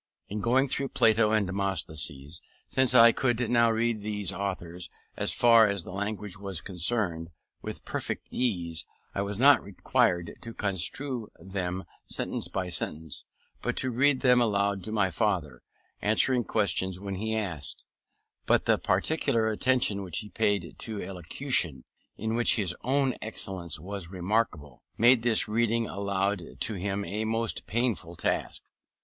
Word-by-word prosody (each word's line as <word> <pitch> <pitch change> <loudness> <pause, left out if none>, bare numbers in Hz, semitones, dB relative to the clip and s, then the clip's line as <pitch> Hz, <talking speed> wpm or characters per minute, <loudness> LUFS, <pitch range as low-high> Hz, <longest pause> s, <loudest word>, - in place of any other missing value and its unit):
In 105 - -3
going 130 +5 +3
through 135 +1 -1
Plato 110 -3 +4
and 110 -1 +2
Demosthenes, 80 -6 -2 0.3
since 130 -1 +3
I 115 -1 +9
could 120 -1 0
now 115 -1 +5
read 115 -1 0
these 105 -3 -2
authors, 90 -3 -4 0.3
as - - 0
far 115 -2 +6
as 100 -3 -1
the - - -9
language 105 +1 -4
was 100 -4 -3
concerned, 90 -3 -1 0.3
with - - -7
perfect - - -4
ease, 85 -10 -1 0.3
I - - -1
was 100 0 -3
not 140 +5 +6
required 90 -2 0
to 115 -1 -8
construe 110 - 0
them 95 0 -4 0.2
sentence - - -1
by 95 -2 -3
sentence, 80 -2 -3 0.4
but - - -2
to 130 - 0
read 130 +3 +3
them 125 -2 +5
aloud 100 -3 +1
to 110 - -5
my 105 -4 +1
father, 95 -5 -1 0.4
answering 120 +3 +2
questions 95 -4 0
when 100 0 -5 0.2
asked: 90 -10 -4 0.6
but - - +3
the - - +3
particular 115 -8 +1
attention 110 -2 +1
which 90 -4 -2
he 105 -1 -3
paid 95 -3 -1
to 110 -3 -4
elocution 90 - -1 0.3
(in 110 +1 -2
which 120 +1 +4
his 95 -6 0
own 135 0 +2
excellence 90 -7 -2
was 95 +1 -6
remarkable) 90 - -2 0.2
made 120 +2 +6
this 115 -1 +4
reading 115 +1 +1
aloud 100 0 -1 0.2
to 115 - 0
him 100 +1 -3
a 105 +5 -3
most 115 +1 -1
painful 105 -8 -1
task. - - -1
105 Hz, 145 wpm, -28 LUFS, 90-115 Hz, 0.6 s, I